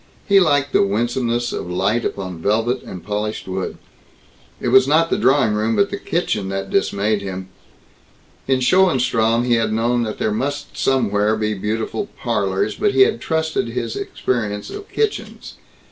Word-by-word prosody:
He 200 -1 +6
liked 145 -5 +2
the - - +5
winsomeness 120 +3 0
of - - -4
light 100 +6 0
upon 95 -4 -4
velvet 115 +6 +1
and 90 -3 -9
polished 105 +2 -3
wood. 95 0 -4 0.8
It - - -1
was 130 +1 +6
not 165 +3 +3
the - - +3
drawing 130 -3 +3
room 110 +2 0
but 200 0 +2
the 200 - -2
kitchen 105 - -2
that 95 0 -4
dismayed 100 +1 +1
him. 95 -1 -6 1.0
In 130 -1 +2
Schoenstrom 125 -8 +3
he 120 - +2
had 115 -1 0
known 120 +2 +1
that 110 -2 -3
there 110 - 0
must 140 +6 -3
somewhere 110 -5 +1
be 110 0 -1
beautiful 110 - -3
"parlors," 405 - 0
but 415 -1 0
he - - +5
had 430 +3 +4
trusted 160 -5 -1
in 115 - -7
his 115 -1 -2
experience 105 -5 -3
of 410 0 -8
kitchens. 435 -1 -3
115 Hz, 165 wpm, -20 LUFS, 105-140 Hz, 1.0 s, He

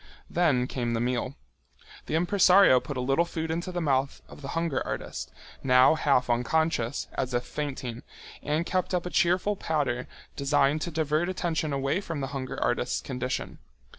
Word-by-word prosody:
Then 150 -8 +2
came 120 -2 -2
the 115 - 0
meal. 125 +2 -1 0.7
The - - -1
impresario 180 -3 +5
put 140 +1 -6
a - - -1
little 135 +6 +2
food 160 -1 -4
into 175 +2 -3
mouth 135 -4 0
of - - -13
the 135 - -6
hunger 165 -5 0
artist, - - -5 0.3
now 125 +2 +6
half 140 -5 +2
unconscious, 125 +1 0
as 130 -2 -2
if 120 - 0
fainting, 130 -5 -5 0.4
and 155 +3 -1
kept 185 0 0
up 180 - -1
a 180 - -4
cheerful 180 +4 +2
patter 140 -9 -1 0.3
designed 140 +1 +2
to 175 - -2
divert 155 +2 0
attention 165 -4 -1
away 140 +6 0
from 165 -6 -5
the 135 -1 -3
hunger 135 -1 -4
artist's 120 0 0
condition. 130 -1 -4
145 Hz, 165 wpm, -27 LUFS, 130-165 Hz, 0.7 s, now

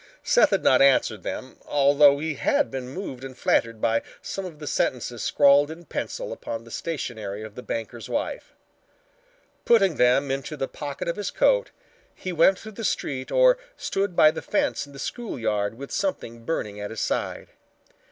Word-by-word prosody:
Seth - - +5
had - - +1
not 130 - +5
answered 130 -6 +4
them, 130 +8 -6
although 140 0 +5
he 155 +2 -2
had 280 - +1
been 130 -1 -5
moved 135 -5 -6
and 130 -1 -8
flattered 115 -1 +1
by 115 +1 +2 0.2
some 195 - -5
of 170 -4 -8
the 150 - -8
sentences 125 -4 -1
scrawled 145 0 +5
in 165 +2 -9
pencil - - -4
upon 115 0 -6
the 115 - -14
stationery 110 -11 -4
of 110 -1 -9
the 125 - -8
banker's 115 0 -5
wife. 310 +12 -3 1.1
Putting 195 -9 +4
them 130 +3 +3
into 135 +3 -4
the 135 - -2
pocket 145 -2 -6
of 170 - -2
his 205 - -2
coat, - - +2 0.5
he 185 - -5
went 170 +3 +5
through 220 - -10
the 225 +2 -8
street 130 -9 -2
or - - +5 0.2
stood 195 -2 -2
by 155 -2 +7
the - - -6
fence - - -1
in 140 - -15
the - - -11
school 235 - -5
yard 105 -2 -1
with 140 +3 -9
something 115 -12 -3
burning 105 -10 -3
at 105 - -4
his 110 - -6
side. - - -2
140 Hz, 180 wpm, -25 LUFS, 120-175 Hz, 1.1 s, by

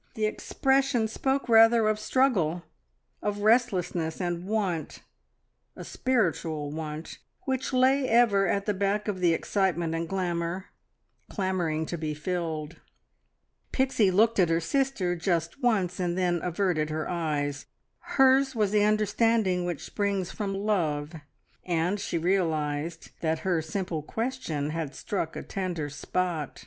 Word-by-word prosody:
The 215 - 0
expression 265 +2 +1
spoke 265 +5 -1
rather 225 -1 +6
of 215 0 +1
struggle, 195 - +1 0.6
of 205 0 -2
restlessness, 185 -8 +2
and 175 0 -3
want 195 -7 -2 0.7
a - - -8
spiritual 165 - -1
want 155 0 -6 0.2
which 260 0 -2
lay 260 +1 +3
ever 220 -4 +4
at 200 0 0
the 210 - +1
back 200 +2 0
of 200 -3 -2
the 175 -2 +3
excitement 175 -4 0
and 165 0 -3
glamour, 180 -1 -2 0.6
clamouring 175 -5 -1
to 170 +1 -5
be 155 -1 -3
filled. 160 -1 -3 0.9
Pixie 260 -6 +2
looked 220 +4 +3
at 175 -3 +4
her 165 0 +2
sister, 195 - 0
just 170 - -1
once, 195 -8 +1
and 175 -1 -1
then 175 -2 +1
averted 175 -4 0
her 155 0 -3
eyes. 145 -4 -2 0.3
Hers 270 0 +3
was 210 -3 +1
the 210 -1 +3
understanding 215 -3 +2
which 175 -4 -4
springs 200 -3 -1
from 200 -2 -3
love, 170 -7 -1 0.5
and 175 +3 0
she 170 - -2
realised 160 -3 -1
that 160 -1 -1
her 175 -4 +2
simple 165 0 -3
question 170 - -3
had 155 -3 -4
struck 165 -6 -3
a - - -5
tender 175 -6 -3
spot. 160 +1 -3
185 Hz, 135 wpm, -27 LUFS, 165-215 Hz, 0.9 s, rather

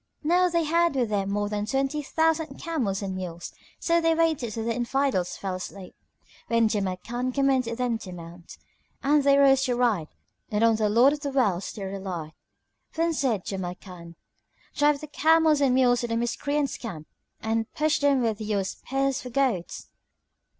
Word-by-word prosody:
Now 355 +4 +3
they 335 -1 +1
had 335 0 +2
with 245 -4 +1
them 200 -1 0
more 205 +1 -1
than 210 0 -3
twenty 270 +4 0
thousand 320 +2 0
camels 235 -13 -2
and 190 -1 -3
mules. 175 -2 -6 0.3
So 335 0 +2
they 330 0 +3
waited 320 -8 +1
till 225 +1 -4
the 230 - 0
Infidels 240 -5 -1
fell 195 -2 -4
asleep, 185 +1 -8 0.5
when 230 -1 +3
Jamrkan 215 +5 -2
commanded 260 -4 +1
them 245 -3 -1
to 190 - -9
mount, 170 0 -11 0.5
and 290 +1 +3
they 280 0 +5
rose 270 -1 +5
to 250 -2 0
ride 225 -10 +1 0.4
and 210 +1 0
on 225 -1 +4
the 215 -1 +1
Lord 240 +7 +5
of 300 - -4
the 285 -1 -3
Worlds 210 -10 0
they 205 - -7
relied. 190 -5 -5 0.6
Then 330 +1 +1
said 245 - 0
Jamrkan, 180 -2 -7 0.6
"Drive 295 -1 +2
the 305 - -7
camels 315 0 +3
and 265 -3 +3
mules 245 -1 +3
to 240 - -2
the 230 0 -1
Miscreants' 285 +5 -1
camp 175 -10 -7 0.3
and 225 0 -2
push 310 0 +1
them 280 -3 +3
with 220 -2 -1
your 210 -2 -1
spears 270 +7 -2
for 250 - -7
goads!" 240 -9 -1
240 Hz, 175 wpm, -26 LUFS, 200-285 Hz, 0.6 s, they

